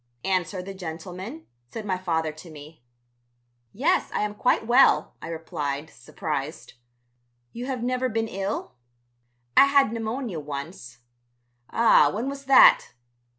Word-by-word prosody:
"Answer 185 0 -1
the 195 +1 -7
gentleman," 185 - -8 0.2
said 220 - -7
my 190 -2 0
father 160 -4 -1
to 155 +3 -13
me. 155 0 -13 0.9
"Yes, 325 - +1
I - - -1
am 210 0 -2
quite 225 +1 +1
well," 245 +4 +4
I - - -7
replied, 155 -2 -4
surprised. 150 +3 -6 0.8
"You 245 +2 -6
have 255 -3 -3
never 255 +1 0
been 225 0 -1
ill?" 195 - -4 0.8
"I - - +8
had 275 -5 +3
pneumonia 225 - -4
once." 140 -4 -8 0.7
"Ah, 230 0 +5
when 225 +6 -3
was 275 0 -8
that?" 270 - +6
195 Hz, 130 wpm, -25 LUFS, 160-240 Hz, 0.9 s, I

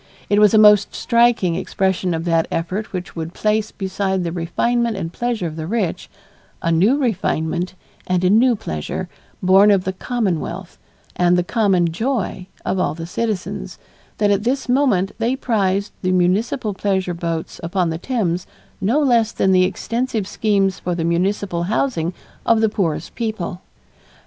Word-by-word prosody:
It 205 - +4
was 210 -2 +6
a - - +7
most 210 -1 +6
striking 235 -7 +3
expression 185 0 -1
of 165 +1 -4
that 165 -1 +2
effort 185 +6 -3
which 185 0 -6
would 165 0 -5
place 215 0 0
beside 190 -1 -2
the 170 - -2
refinement 225 +7 0
and 165 -2 -4
pleasure 240 -6 -2
of 160 -1 -5
the 160 0 -4
rich, 205 -4 -2 0.5
a 165 - 0
new 195 +12 +4
refinement 180 - -1 0.3
and 185 0 +1
a 180 - +4
new 235 +3 +5
pleasure 80 - -5 0.3
born 190 +3 +6
of 195 -3 +4
the 190 - -2
commonwealth 190 -4 -3 0.4
and 180 0 +3
the 180 - +2
common 185 -5 +2
joy 210 -2 -2 0.2
of 190 - 0
all 180 - 0
the 165 0 -6
citizens, 185 - -3 0.4
that 205 -1 +2
at 200 0 +1
this 260 +3 -1
moment 245 -8 +2
they 235 +3 +1
prized 200 -6 0
the 185 - 0
municipal 200 +5 +1
pleasure 190 -2 -1
boats 165 -1 -4
upon 170 0 0
the 160 - -4
Thames 185 -7 -1 0.3
no 225 +10 +2
less 235 -6 +3
than 190 - +1
the 185 -1 +5
extensive 225 +2 -2
schemes 195 -3 +1
for 175 -1 -2
the 170 - -2
municipal 175 +1 0
housing 185 -5 0 0.3
of 230 -1 +3
the 220 -1 +3
poorest 185 -7 -2
people. 215 -6 -4
190 Hz, 165 wpm, -20 LUFS, 175-220 Hz, 0.5 s, a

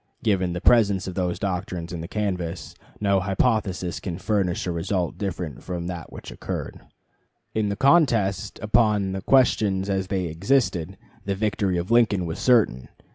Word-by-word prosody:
Given 95 -5 +1
the 90 - -4
presence 100 -6 +4
of 95 - -5
those 90 -1 -1
doctrines 90 -3 -3
in 85 - -4
the 85 - -6
canvass, 90 -5 -3 0.3
no 100 -2 +2
hypothesis 95 -2 0
can 85 -4 -5
furnish 100 -5 0
a 90 - -1
result 85 +1 -2
different 90 - -4
from 90 -2 -5
that 85 -3 -6
which - - -9
occurred. - - -5 0.7
In 110 -2 0
the 100 - -1
contest 115 - +2
upon 105 -3 +2
the 95 0 -4
questions 100 -6 +2
as 95 -1 -1
they 95 -1 -1
existed, 95 - 0 0.3
the 100 0 -1
victory 100 -2 0
of 85 +5 -3
Lincoln 110 -6 +3
was 80 -1 -5
certain. 110 - +2
95 Hz, 160 wpm, -24 LUFS, 90-105 Hz, 0.7 s, presence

